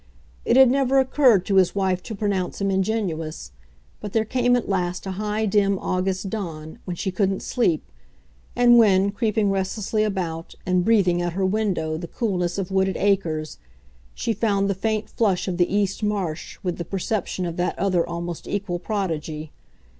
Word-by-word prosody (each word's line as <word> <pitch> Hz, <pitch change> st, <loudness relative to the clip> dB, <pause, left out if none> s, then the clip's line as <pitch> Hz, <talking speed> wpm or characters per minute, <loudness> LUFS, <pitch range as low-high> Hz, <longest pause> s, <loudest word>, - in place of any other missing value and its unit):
It 245 Hz, -, +3 dB
had 265 Hz, -2 st, +7 dB
never 270 Hz, 0 st, +2 dB
occurred 260 Hz, -7 st, +4 dB
to 195 Hz, -, +1 dB
his 185 Hz, 0 st, +4 dB
wife 190 Hz, -2 st, 0 dB
to 220 Hz, -, -7 dB
pronounce 195 Hz, -3 st, -2 dB
him 195 Hz, -1 st, 0 dB
ingenuous, 185 Hz, -, -2 dB, 0.5 s
but 205 Hz, -, -7 dB
there 220 Hz, -1 st, +2 dB
came 245 Hz, +1 st, +2 dB
at 245 Hz, -, -1 dB
last 180 Hz, -2 st, -1 dB
a 190 Hz, -, -3 dB
high 210 Hz, +3 st, -1 dB
dim 200 Hz, -1 st, +2 dB
August 185 Hz, +1 st, -1 dB
dawn 165 Hz, -7 st, -6 dB
when 180 Hz, -, -4 dB
she 190 Hz, -, -2 dB
couldn't 195 Hz, 0 st, 0 dB
sleep 200 Hz, -, +1 dB, 0.7 s
and 240 Hz, -1 st, +6 dB
when, 200 Hz, -3 st, +4 dB
creeping 215 Hz, -1 st, +1 dB
restlessly 195 Hz, +2 st, -1 dB
about 175 Hz, -6 st, -3 dB
and 180 Hz, 0 st, +2 dB
breathing 185 Hz, -5 st, +3 dB
at 175 Hz, -1 st, -2 dB
her 190 Hz, +1 st, 0 dB
window 185 Hz, -6 st, 0 dB
the 170 Hz, +1 st, -6 dB
coolness 180 Hz, -4 st, -1 dB
of 195 Hz, -1 st, -3 dB
wooded 190 Hz, 0 st, +1 dB
acres, 170 Hz, -6 st, 0 dB, 0.6 s
she 230 Hz, -, -1 dB
found 200 Hz, -3 st, +1 dB
the 200 Hz, -, +1 dB
faint 215 Hz, +2 st, -1 dB
flush 200 Hz, -6 st, 0 dB
of 180 Hz, -2 st, -2 dB
the 175 Hz, -1 st, +2 dB
east 200 Hz, 0 st, 0 dB
march 195 Hz, -7 st, -2 dB
with 180 Hz, -2 st, -2 dB
the -, -, -1 dB
perception 190 Hz, 0 st, -2 dB
of 170 Hz, -1 st, -4 dB
that 180 Hz, +1 st, -1 dB
other 185 Hz, -3 st, +2 dB
almost 170 Hz, 0 st, -5 dB
equal 195 Hz, -3 st, -2 dB
prodigy. 160 Hz, -6 st, -3 dB
195 Hz, 175 wpm, -23 LUFS, 175-215 Hz, 0.7 s, had